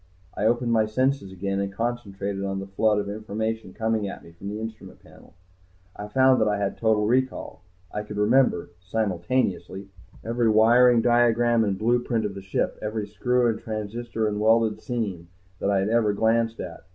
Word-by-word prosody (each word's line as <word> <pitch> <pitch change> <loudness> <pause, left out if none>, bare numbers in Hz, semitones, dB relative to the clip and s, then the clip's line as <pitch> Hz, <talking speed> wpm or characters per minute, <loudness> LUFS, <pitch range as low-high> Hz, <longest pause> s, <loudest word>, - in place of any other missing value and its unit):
I 105 - -2
opened 120 +1 +2
my 110 -2 +3
senses 130 -2 0
again 100 +1 -3
and 100 0 -2
concentrated 100 -3 -3
on 95 0 -2
the 95 - -5
flood 105 +2 +1
of 100 -1 -2
information 110 0 -4
coming 110 0 -1
at - - -8
me 85 - -14
from 90 +4 -8
the 105 +1 -5
instrument 110 -1 -9
panel. - - -18 0.6
I 105 - -7
found 130 +2 +4
that 110 - +3
I 105 -1 +1
had 100 -1 -2
total 110 -2 +2
recall, 130 -5 -1 0.3
I 105 - -2
could 105 0 -8
remember 105 -5 +2
simultaneously 100 0 -2 0.4
every 115 0 +1
wiring 115 +2 +5
diagram 120 -1 +3
and 100 -3 -1
blueprint 115 0 +1
of 100 - -3
the 100 - -8
ship, 95 0 -2
every 110 0 -3
screw 125 +4 +1
and 115 -2 -1
transistor 110 0 -3
and 105 -1 -2
welded 110 0 +2
seam, 100 -9 -4 0.3
that - - 0
I 100 -1 +2
had 100 - -1
ever 110 -2 +2
glanced 115 +2 +1
at. 85 -2 -7
110 Hz, 180 wpm, -25 LUFS, 100-115 Hz, 0.6 s, wiring